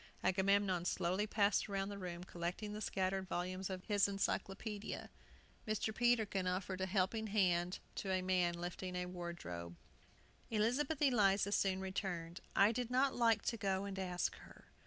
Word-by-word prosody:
Agamemnon 190 -1 +3
slowly 185 +3 0
passed 205 0 +2
round 195 0 -1
the 200 - -5
room, 175 -2 -5
collecting 180 +4 -4
the 210 - -5
scattered 190 -1 -1
volumes 185 +2 -2
of 185 -1 -4
his 205 -2 +3
Encyclopædia. 200 +1 -3 0.6
Mr. 215 0 0
Peterkin 220 -6 +2
offered 185 +1 -2
a 190 - 0
helping 205 +3 +1
hand 180 -4 +2 0.2
to 195 - -4
a 185 -1 +1
man 180 -2 +2
lifting 175 +1 -4
a 180 0 -1
wardrobe. 170 - -6 0.7
Elizabeth 255 +8 +1
Eliza 200 -7 +4
soon 190 -2 +2
returned. 185 -3 -3
"I 200 +2 +6
did 240 0 -2
not 260 +2 +3
like 230 -3 +3
to 230 - -1
go 195 -1 0
and 195 -1 -4
ask 180 -2 -1
her. - - -15
195 Hz, 155 wpm, -37 LUFS, 180-210 Hz, 0.7 s, I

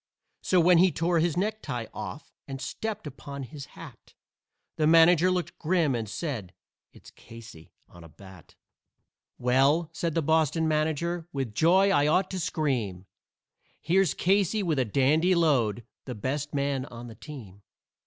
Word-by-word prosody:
So 185 - +2
when 175 0 +5
he 185 +1 +5
tore 165 +1 0
his 170 0 0
necktie 195 - -3
off 145 - -8
and 135 -1 -6
stepped 220 +8 -5
upon 140 0 -8
his 145 +2 -9
hat 140 -9 -13 0.6
The 155 - +2
manager 165 +2 +6
looked 180 -1 -3
grim 165 -3 +1
and 115 -3 -3
said, 110 - -5 0.4
"It's - - -16
Casey 115 -7 -14 0.2
on 85 - -15
a 85 - -13
bat." 95 -1 -16 0.8
"Well," 135 +7 +2
said 170 -2 -3
the 165 - +1
Boston 160 +1 +1
manager, 160 +2 -1
"with 135 -6 -4
joy 185 - +4
I 145 -2 +3
ought 185 +5 +1
to 190 - -3
scream 120 - -2 0.7
Here's 185 -4 +1
Casey 200 +2 +1
with 160 -6 0
a 130 - +2
dandy 150 - +2
load, 125 -9 +1 0.2
the 125 - -6
best 140 +7 -3
man 140 -2 -1
on 120 0 -10
the 115 - -10
team. 110 -8 -11
150 Hz, 155 wpm, -27 LUFS, 125-170 Hz, 0.8 s, manager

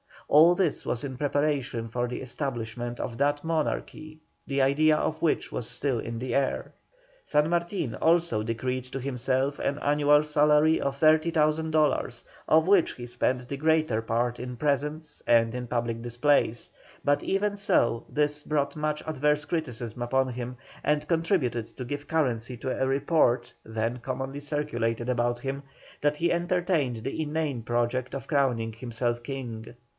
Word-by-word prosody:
All 165 +4 +7
this 175 -5 0
was 120 - -1
in 130 -3 -5
preparation 145 -5 -1
for 120 +2 -1
the 125 - -5
establishment 120 -2 -4
of 115 - -5
that 145 +1 +1
monarchy, 155 -1 -3 0.3
the 140 0 +1
idea 150 +3 +4
of 155 +1 -1
which 165 - +1
was 115 - -3
still 135 -5 -1
in 115 +1 -5
the 130 +1 -3
air. 135 -1 0 0.5
San 150 +1 +2
Martin 170 - -1
also 165 -8 +2
decreed 125 +3 -2
to 130 +1 -6
himself 130 +1 -1
an 140 - -1
annual 150 0 +4
salary 150 +1 +4
of 140 0 -1
30,000 155 0 +3
dols., 145 -6 +1 0.2
of 160 +1 +5
which 190 -2 +4
he 120 - -8
spent 125 +1 -1
the 140 - -3
greater 155 -6 +2
part 120 +2 -1
in 125 0 -5
presents 150 +2 -1
and 115 -1 +4
in 125 0 -4
public 115 -1 -2
displays; 120 0 +1 0.3
but 145 0 +2
even 205 +1 0
so, 120 - +2
this 150 0 0
brought 140 -2 -1
much 150 0 -2
adverse 150 -1 +1
criticism 125 -9 -4
upon 130 +2 +1
him, 125 0 -5 0.3
and 150 0 0
contributed 165 - 0
to 130 - -4
give 145 +3 -5
currency 125 -6 0
to 125 +2 -4
a 130 - 0
report 135 -4 +2
then 110 +2 -2
commonly 135 +3 -4
circulated 125 -6 -2
about 120 -1 +1
him, 135 +2 -4 0.4
that 145 0 +1
he 170 +3 +1
entertained 170 -9 0
the 135 +4 -3
inane 150 -4 -2
project 120 +3 -1
of 135 - -6
crowning 125 -6 +1
himself 120 +1 -2
King. 120 -3 -6
135 Hz, 155 wpm, -27 LUFS, 120-150 Hz, 0.5 s, All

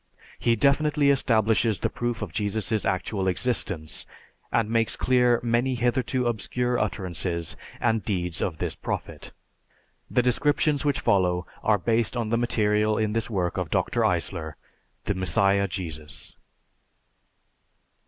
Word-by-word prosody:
He 115 - +2
definitely 140 +3 +3
establishes 110 -5 +2
the - - -1
proof 120 -1 -3
of - - -7
Jesus' 105 0 0
actual 95 +1 -1
existence, 95 -6 -1 0.4
and 115 -2 +2
makes 115 0 +1
clear 125 -2 +3
many 120 +2 +1
hitherto 125 +1 0
obscure 120 +2 -1
utterances 85 -3 -2 0.2
and 115 -2 +1
deeds 90 -5 -2
of 85 -5 -2
this - - -2
Prophet. - - -5 0.8
The 125 - +2
descriptions 145 +4 +2
which 145 -3 +1
follow 90 -2 +2 0.2
are 110 -1 +3
based 115 +4 0
on 115 -2 -1
the 115 - +2
material 105 -2 +2
in 110 -1 0
this 115 +1 -1
work 90 -5 -1
of - - -3
Dr. - - 0
Eisler, 80 -1 -1 0.5
"The - - -1
Messiah 100 +2 +2
Jesus." 80 -6 -5
110 Hz, 130 wpm, -25 LUFS, 95-120 Hz, 0.8 s, definitely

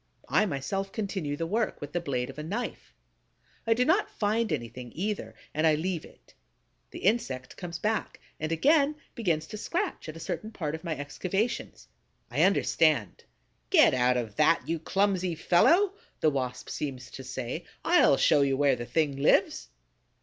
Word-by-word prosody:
I 210 - +3
myself 195 +6 -3
continue 190 -9 -3
the 165 - -2
work, 215 +6 -1
with 145 - -8
the 175 - +1
blade 135 -6 -2
of 135 - -11
a - - -4
knife. 210 +10 -5 0.7
I 225 - +4
do 250 +2 +2
not 370 +8 +3
find 215 0 0
anything, 120 -3 -4
either; 180 - -3 0.2
and 155 +1 +2
I 155 - +4
leave 170 +1 -2
it. - - -19 0.6
The - - -9
insect 135 - 0
comes 170 -2 -6
back 215 0 -2 0.2
and 155 +1 -3
again 290 - +3 0.2
begins 170 -10 0
to 215 - -8
scratch 345 - -3
at 155 - -7
a - - -8
certain 215 +5 -4
part 160 -9 -4
of 160 - -6
my 165 -4 -3
excavations. 185 - -3 0.4
I - - +1
understand: - - +2 0.4
"Get 320 - +6
out 125 0 +3
of 110 -4 -4
that, 155 +2 +3
you 165 0 -1
clumsy 185 0 0
fellow!" 335 - +4 0.3
the 155 - +3
Wasp 130 -3 -3
seems 135 -4 -5
to 135 - -8
say. 130 -2 -5 0.2
"I'll - - +5
show 145 - +4
you 135 -1 +2
where 140 -1 +3
the 120 -1 -6
thing 150 -4 0
lives!" 140 - +2
165 Hz, 170 wpm, -28 LUFS, 140-210 Hz, 0.7 s, Get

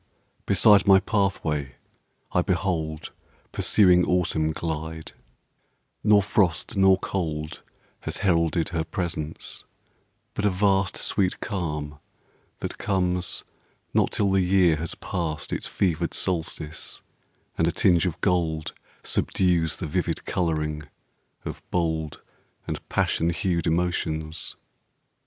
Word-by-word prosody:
beside 100 +1 +5
my 95 -1 +8
path 100 -1 0
way 75 -4 -2 0.6
I - - +3
behold 80 -4 -2 0.4
Pursuing 90 -3 +4
Autumn 85 -3 +1
glide: 80 0 -4 0.9
nor 105 -1 +5
frost 95 +2 +1
nor 95 -1 +5
cold 80 -4 -3 0.4
Has - - -4
heralded 85 -2 +2
her 85 -3 -1
presence; 80 -2 -4 0.7
but 100 - -3
a 105 - +4
vast 95 0 +2
Sweet 95 -3 0
calm 75 -7 -4 0.6
that - - -4
comes 90 -2 0 0.5
not - - +3
till 100 -2 +1
the 95 0 +3
year 90 -2 +4
has 80 +2 -4
passed 80 -4 -3
Its - - -2
fevered 85 -6 0
solstice, 80 -3 -3 0.5
and 80 - +2
a - - +2
tinge 85 0 +3
of 85 - -4
gold 80 -4 0 0.3
Subdues 85 -3 +1
the 90 - -5
vivid 75 - -2
colouring 75 -3 -1 0.6
of - - -6
bold 80 -3 -1 0.4
And - - -6
passion 80 - +1
hued 85 0 0
emotions. 80 -2 -1
85 Hz, 115 wpm, -25 LUFS, 80-95 Hz, 0.9 s, my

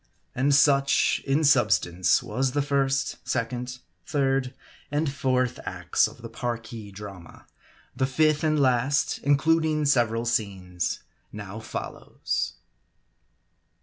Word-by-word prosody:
And 140 +3 +2
such, 140 -1 +3
in 140 +4 +2
substance, 100 - +3
was 130 +4 -1
the 145 -1 +1
first, 135 -1 0
second, 125 +1 -3 0.3
third 135 +2 0 0.4
and 145 -1 -1
fourth 130 -3 0
acts - - +1
of - - -14
the - - -5
Parki 115 -2 -5
drama. 95 -4 -11 0.5
The 130 - +1
fifth 155 +2 +2
and 155 -1 +2
last, 130 +1 +2
includ 155 +3 +3
ing 155 -1 0
several 120 -4 +2
scenes, 95 -7 -2 0.3
now 105 0 -7
follows. 110 - -4
130 Hz, 115 wpm, -26 LUFS, 115-140 Hz, 0.5 s, such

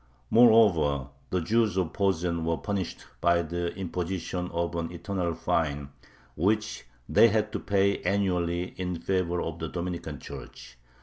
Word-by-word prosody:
Moreover, 90 - +5 0.2
the 90 - 0
Jews 110 +2 +2
of 90 -3 0
Posen 90 -4 0
were 85 0 0
punished 100 -4 -4 0.2
by 85 0 +3
the 85 +1 -2
imposition 90 -1 -3
of 85 0 -2
an 85 0 -2
"eternal" 85 -1 -2
fine, 70 -4 -1 0.5
which 105 +6 0 0.2
they 115 - +6
had 110 -1 +1
to - - -2
pay 100 0 +1
annually 90 -2 0
in 90 -1 -2
favor 90 -1 0
of 80 0 -5
the 80 - -3
Dominican 85 -4 -4
church. - - -10
90 Hz, 140 wpm, -28 LUFS, 85-100 Hz, 0.5 s, they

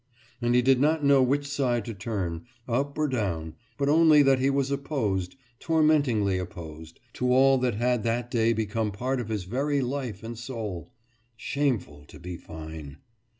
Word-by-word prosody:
And 120 0 +2
he 125 - +4
did 130 0 +4
not 155 +2 +2
know 140 -1 +5
which 140 +3 +1
side 125 -6 0
to 115 - -5
turn, 95 -5 -4 0.2
up 135 +4 -1
or 155 0 +1
down, 90 - -2 0.2
but 140 -1 0
only 155 -1 +6
that 135 -1 +4
he 135 +1 +2
was 140 0 0
opposed, 125 - -2 0.2
tormentingly 145 - +2
opposed, 80 -2 -9
to 125 0 0
all 135 +1 +5
that 125 -3 0
had 120 +1 +1
that 120 +2 -2
day 115 -1 +2
become 110 -1 -1
part 125 +6 -2
of 115 - -7
his 105 -4 -2
very 140 +9 -1
life 125 -5 -4
and 115 0 -7
soul. 115 -5 -6 0.5
Shameful 115 - -2
to - - -14
be 90 +1 -6
fine.... 80 -3 -9
120 Hz, 170 wpm, -27 LUFS, 100-140 Hz, 0.5 s, only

